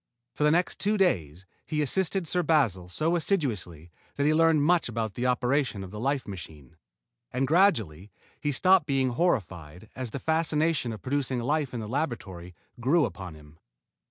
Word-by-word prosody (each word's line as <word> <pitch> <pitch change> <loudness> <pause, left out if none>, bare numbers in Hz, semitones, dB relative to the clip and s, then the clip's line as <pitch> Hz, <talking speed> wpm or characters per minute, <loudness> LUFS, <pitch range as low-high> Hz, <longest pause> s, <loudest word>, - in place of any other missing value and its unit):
For - - -2
the 150 - +5
next 175 +4 +1
two 210 +1 +1
days, 90 - 0 0.2
he 150 -1 -1
assisted 190 +3 0
Sir 180 - +1
Basil 125 - +1
so 160 - 0
assiduously 105 - -2 0.2
that 140 - 0
he 155 - +4
learned 160 -2 +4
much 170 -3 +2
about 110 -3 -3
the 125 +4 -1
operation 125 -3 0
of 95 - -9
the 105 - -7
life 135 +3 -1
machine. 80 -6 -10 0.6
And 130 +2 0
gradually 115 - +2 0.3
he 145 - -1
stopped 185 +3 +4
being 135 -2 +1
horrified 95 - -2
as 130 -1 -5
the 125 - -5
fascination 160 -3 0
of 110 - -8
producing 135 -1 -1
life 145 +2 0
in 120 - -4
the 105 - -6
laboratory 105 - -4 0.2
grew 145 +6 +3
upon 95 -6 -7
him. 75 +1 -17
130 Hz, 170 wpm, -27 LUFS, 95-155 Hz, 0.6 s, the